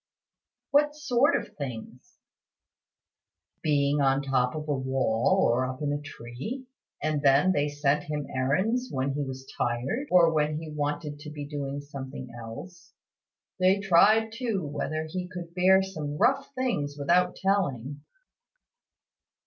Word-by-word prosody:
"What 295 +1 +3
sort 280 -2 +2
of - - -4
things?" 125 -3 -8 1.4
"Being 145 -1 +2
on 135 0 +3
the - - -9
top 125 0 +1
of 155 0 -5
a 145 - +1
wall, 130 +6 +1
or 120 +2 +2
up 130 0 -6
in 145 0 0
a 145 - -3
tree. 145 - -7 0.4
And 155 -1 0
then 145 +6 +5
they 145 -4 +1
sent 145 0 0
him 150 -1 -3
errands 190 - 0
when 135 +1 -1
he 145 - -2
was 130 -1 -5
tired, 125 - -1
or 170 -2 +5
when 150 0 +1
he 160 -1 -8
wanted 145 0 -3
to 150 - -8
be 150 -1 -6
doing 145 -1 -4
something 135 -3 -8
else. 170 +11 -10 0.7
They 185 +2 +4
tried 205 +4 +4
too 225 - -2
whether 155 +2 -3
he 180 +3 -4
could 175 -2 -7
bear 190 +2 +5
some 155 -6 -5
rough 270 - +2
things 190 - -1
without 175 +5 +2
telling." 145 - -1
150 Hz, 145 wpm, -27 LUFS, 140-185 Hz, 1.4 s, then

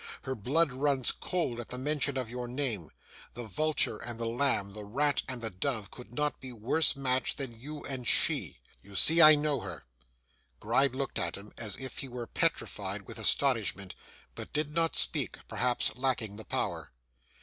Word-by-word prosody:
Her 135 - -2
blood 135 +6 +2
runs 135 -1 +2
cold 165 -10 -2
at 120 - -5
the 125 - -5
mention 140 0 0
of 130 -2 -1
your 125 +1 -5
name; 120 - -2 0.5
the 120 - -5
vulture 115 +1 0
and 120 -1 -6
the 115 - -2
lamb, 115 -4 0
the 105 0 -7
rat 140 +8 +1
and 125 -3 -5
the 110 - -2
dove, 110 +2 -2
could 125 -2 -11
not 150 +4 -1
be 130 - -6
worse 125 +8 +2
matched 130 -1 0
than 125 -5 -6
you 150 +4 -7
and 130 -3 -3
she. - - +2 0.2
You 100 0 -14
see 165 - +7
I 155 -1 +11
know 145 -2 +1
her.' - - -7 0.7
Gride 125 +4 +2
looked 135 -1 -2
at 85 +1 -2
him 100 +2 -11
as 110 -4 -3
if 130 -1 -6
he 135 - -3
were 120 -1 -5
petrified - - -1
with - - -9
astonishment, 105 -8 +2 0.4
but - - -8
did 150 0 0
not 165 0 +1
speak; - - +1
perhaps 125 -1 0
lacking 120 -6 -1
the 110 - -9
power. - - -2
125 Hz, 185 wpm, -31 LUFS, 115-140 Hz, 0.7 s, I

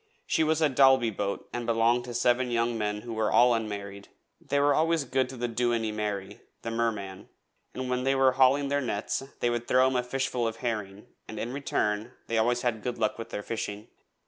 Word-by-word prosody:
She 160 - +2
was 160 0 +1
a - - +6
Dalby 130 -3 +5
boat 100 0 -3
and 120 -1 -4
belonged 115 +1 +2
to 120 -1 -7
seven 120 +1 +2
young 120 0 0
men 105 -1 -2
who 120 0 -7
were 110 -1 0
all 125 0 +5
unmarried. 100 -3 -4 0.4
They 145 - 0
were 145 0 +4
always 165 0 +2
good 130 -1 0
to 130 - -8
the 120 0 -1
Dooinney 115 -1 0
Marrey, 105 -2 -4 0.2
the 115 - -3
Merman, 105 -5 -3 0.5
and 130 0 -3
when 125 0 -1
they 135 +1 +2
were 135 -1 +4
hauling 135 +2 +3
their 140 0 +1
nets 110 -3 -2 0.2
they 120 - +2
would 120 0 -3
throw 130 +1 +4
him 130 - -3
a 125 - +3
dishful 125 -1 -1
of 110 - -3
herring, 105 -4 -4 0.2
and 110 - -8
in 120 +2 -4
return 110 -4 -1
they - - -7
had - - +4
always 120 +2 +1
good 120 0 -2
luck 110 0 -1
with 115 - -6
their 105 - -5
fishing. 105 -1 -5
120 Hz, 215 wpm, -28 LUFS, 110-130 Hz, 0.5 s, a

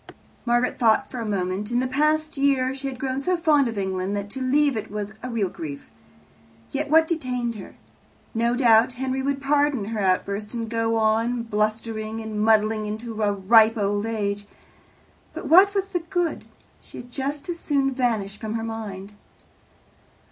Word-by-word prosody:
Margaret 240 +1 +1
thought 230 +3 +3
for 250 - -5
a 225 - -3
moment. 195 +1 -2
In 240 - 0
the 255 - 0
past 305 +4 +1
year 275 -2 +2
she 275 +1 -5
had 265 -2 -5
grown 265 +1 -2
so 360 +5 +1
fond 300 -5 +3
of 225 -2 -5
England 190 0 -2
that 200 0 -5
to 265 - -5
leave 280 +1 +2
it 215 - -4
was 210 0 -5
a 255 - -5
real 225 -5 0
grief. 150 -5 -8 0.8
Yet 290 +1 -2
what 320 +1 +5
detained 250 -7 -2
her? 210 -4 -10 0.6
No 235 +1 +1
doubt 240 -1 +5
Henry 260 +1 -2
would 275 0 -1
pardon 285 -4 +1
her 220 - -2
outburst, 200 +3 -1
and 230 -1 -3
go 225 0 0
on 225 +2 +1
blustering 215 0 -2
and 220 -1 -4
muddling 215 0 +3
into 220 +1 -5
a 205 -1 +2
ripe 220 +3 +5
old 205 +1 0
age. 205 -2 -2 0.9
But - - -6
what 390 +4 +6
was 395 0 0
the 360 - -1
good? 340 0 -2 0.4
She - - -13
had 245 0 -10
just 280 +4 -4
as 345 -1 -4
soon 275 -4 0
vanish 220 -6 -1
from 220 0 -4
his 225 0 -2
mind. 210 -3 -6
230 Hz, 175 wpm, -24 LUFS, 215-270 Hz, 0.9 s, what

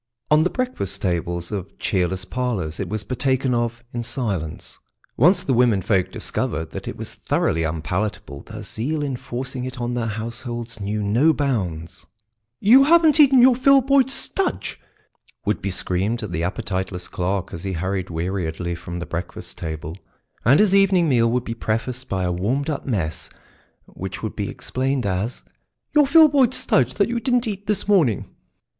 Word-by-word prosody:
On 150 +1 +6
the 175 - +2
breakfast 180 - -2
tables 85 -1 -2
of 100 -2 -5
cheerless 95 -1 0
parlours 100 -9 -2
it 95 - -3
was 110 +1 -3
partaken 130 +1 0
of 120 0 -1
in 120 - -2
silence. 100 - -4 0.4
Once 180 - +4
the 155 - 0
womenfolk 105 -6 +2
discovered 80 -1 -2
that - - -7
it - - -5
was - - -5
thoroughly 80 - 0
unpalatable, 80 -1 -3
their 110 -1 -9
zeal 145 +9 -3
in 140 -3 -2
forcing 125 +1 -5
it 130 0 -6
on 120 0 -2
their 120 -2 -1
households 115 +1 -4
knew 105 +1 -2
no 120 +11 +3
bounds. 95 - -3 0.5
"You 255 +7 +7
haven't 320 -1 +5
eaten 270 -4 +7
your 260 0 +7
Filboid 270 +1 +4
Studge!" 385 +7 -1 0.7
would 105 - 0
be 100 - -2
screamed 95 +5 -1
at 105 - -5
the 85 - -2
appetiteless 95 -1 -3
clerk 95 +1 -2
as 85 - -6
he 95 -1 -3
hurried 95 +2 -2
weariedly 85 0 -3
from 85 +1 -6
the 90 - -4
breakfast 85 +1 -6
table, 80 0 -5 0.5
and 135 +6 +5
his 210 -2 +4
evening 190 -4 +4
meal 115 -3 +3
would 125 +1 0
be 115 - -4
prefaced 115 +3 -3
by 95 -1 -1
a 90 - 0
warmed 125 - -1
up 145 - -5
mess 90 -11 -2 0.6
which 95 +2 -7
would 110 - -4
be 100 -2 -3
explained 130 -1 -2
as 100 +5 -2 0.5
"your 295 -2 +5
Filboid 285 -5 +6
Studge 130 - +2
that 200 - +2
you 235 0 -1
didn't 245 0 +1
eat 205 -1 -5
this 210 -1 0
morning." 165 - +3
115 Hz, 165 wpm, -22 LUFS, 95-150 Hz, 0.7 s, You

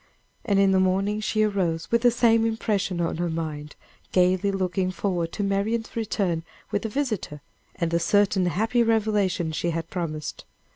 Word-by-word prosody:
And 200 -4 +1
in 195 -1 +4
the 190 - +4
morning 195 +3 +1
she 215 0 +1
arose 175 -6 -1
with 235 0 +3
the 245 - +6
same 230 -1 +3
impression 210 -5 -1
on 165 - -1
her 175 0 -1
mind, 155 -2 -5 0.4
gayly 185 +2 +3
looking 185 -1 -1
forward 180 -3 -2
to 205 - -2
Marian's 205 +3 -1
return 200 -7 -1 0.3
with 205 - 0
the 225 - -3
visitor, 215 - -3 0.3
and 170 -1 -1
the 170 - +2
certain 190 +1 +2
happy 225 +7 +1
revelation 210 -7 +1
she 170 +2 -1
had 165 0 -4
promised. 155 -5 -4
195 Hz, 165 wpm, -25 LUFS, 170-215 Hz, 0.4 s, the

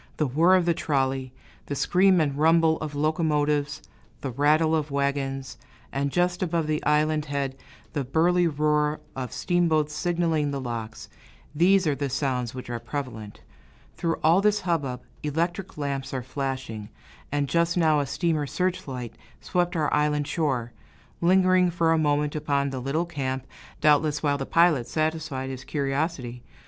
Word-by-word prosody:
The 155 - +1
whirr 165 +8 +4
of 180 -2 +3
the 170 - +3
trolley, 135 -4 -1 0.4
the 140 - -3
scream 185 +5 +4
and 145 -3 +1
rumble 160 +1 +4
of 150 -2 -5
locomotives, 150 -1 0 0.4
the 135 - -3
rattle 155 +5 +3
of 155 -1 -1
wagons; 140 -2 -2 0.3
and 140 +1 -1
just 175 +2 +1
above 170 -3 0
the 155 0 -1
island 150 0 +2
head, 140 -2 -2 0.4
the 145 -4 -1
burly 170 +6 +2
roar 150 0 +1 0.2
of 130 -2 -4
steamboats 160 -4 +1
signaling 165 -2 0
the 140 -1 -3
locks, 115 -3 -5 0.5
these 185 +4 +4
are 150 - +2
the 140 0 -3
sounds 130 -2 -2
which 130 - -7
are 120 -1 -4
prevalent. 115 -3 -6 0.5
Through 165 -1 -1
all 165 +5 +5
this 210 0 +2
hubbub, 140 -8 -2 0.2
electric 170 +5 -2
lamps 140 -2 -3
are 130 - -3
flashing, 130 -5 -4 0.4
and 145 0 0
just 170 +3 +1
now 155 -3 +4
a 140 - -1
steamer's 155 -1 -1
search 180 -3 -1
light 125 -4 -5 0.3
swept 175 0 -1
our 155 -3 0
island 150 0 +1
shore, 135 -7 -1 0.5
lingering 185 +1 +4
for 165 -1 +1
a 165 - +2
moment 150 -1 +1
upon 140 -2 0
the 130 - -4
little 140 +7 -1
camp, 130 -5 -3 0.4
doubtless 150 0 +3
while 145 -1 +1
the 135 - -4
pilot 165 -8 +3
satisfied 155 -4 -2
his 130 -1 -7
curiosity. 135 -3 -2
150 Hz, 155 wpm, -26 LUFS, 135-165 Hz, 0.5 s, all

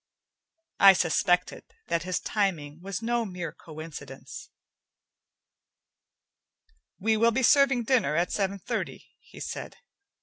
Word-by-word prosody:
I 195 -1 +9
suspected 175 +1 +1 0.3
that 170 0 +1
his 180 +1 -2
timing 165 -7 -2
was 195 +4 -5
no 235 0 +1
mere 180 -6 -5
coincidence. 155 0 -10 2.5
"We 220 +3 +1
will 230 +2 +4
be 250 +3 0
serving 270 -2 +5
dinner 230 - +2
at 170 +2 +1
seven 200 -1 -1
thirty," - - -4
he - - -15
said. - - -6
190 Hz, 110 wpm, -27 LUFS, 165-225 Hz, 2.5 s, I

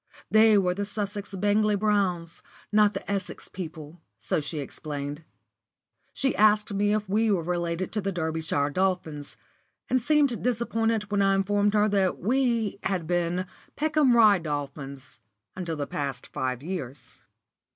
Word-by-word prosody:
They 220 -1 +6
were 180 -2 +2
the 200 +2 -3
Sussex 205 -1 -4
Bangley 205 +2 +2
Browns, 190 -5 0 0.3
not 210 -1 +4
the - - -5
Essex 200 -1 -4
people, 160 -2 -8 0.2
so - - -1
she 155 +2 -5
explained. 145 +1 -5 0.9
She 270 - -1
asked 210 0 +3
me 205 +1 +1
if 210 -1 0
we 215 +3 +2
were 190 -5 +1
related 175 +1 -2
to 215 - -1
the 195 +1 -2
Derbyshire 160 -4 -1
Dolphins, 180 -5 -2 0.5
and 255 0 +3
seemed 285 -2 +2
disappointed 225 -3 0
when 205 -1 +2
I 195 0 +3
informed 205 +2 +1
her 210 0 +4
that 195 -3 +1
we 235 -2 0
had 185 -4 -1
been 175 +1 0 0.3
Peckham 300 -4 +3
Rye 210 -4 +6
Dolphins 140 -4 -6 0.4
until 175 -3 -3
the 145 -2 -3
past 135 -2 -4
five 130 0 -3
years. 145 -7 -7
195 Hz, 145 wpm, -26 LUFS, 160-210 Hz, 0.9 s, They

